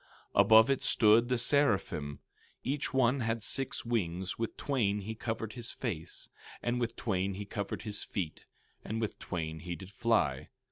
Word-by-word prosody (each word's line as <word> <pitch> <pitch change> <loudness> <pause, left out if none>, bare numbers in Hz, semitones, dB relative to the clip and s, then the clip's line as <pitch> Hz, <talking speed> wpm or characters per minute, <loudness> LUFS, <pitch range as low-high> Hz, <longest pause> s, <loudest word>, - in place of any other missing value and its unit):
16:2 - - +8
Above 110 +3 +7
it 135 - 0
stood 115 +2 +5
the 125 - +2
seraphim; 105 - +1 0.4
each 140 +3 -1
one 130 0 +3
had 115 -2 -1
six 135 +5 -1
wings; 95 -5 -1
with 115 - -3
twain 105 -8 0
he 110 +3 -4
covered 110 -1 -4
his 120 -1 -5
face, 85 -9 -5 0.4
and 120 +1 0
with 115 -1 -1
twain 95 -3 -1
he 100 +1 -5
covered 100 +1 -4
his 105 -2 -3
feet, 85 -6 -4 0.4
and 110 +2 -3
with 110 -2 -3
twain 80 -3 -4
he 85 +2 -5
did 95 +1 -10
fly. 105 - +1
110 Hz, 170 wpm, -32 LUFS, 95-120 Hz, 0.4 s, 16:2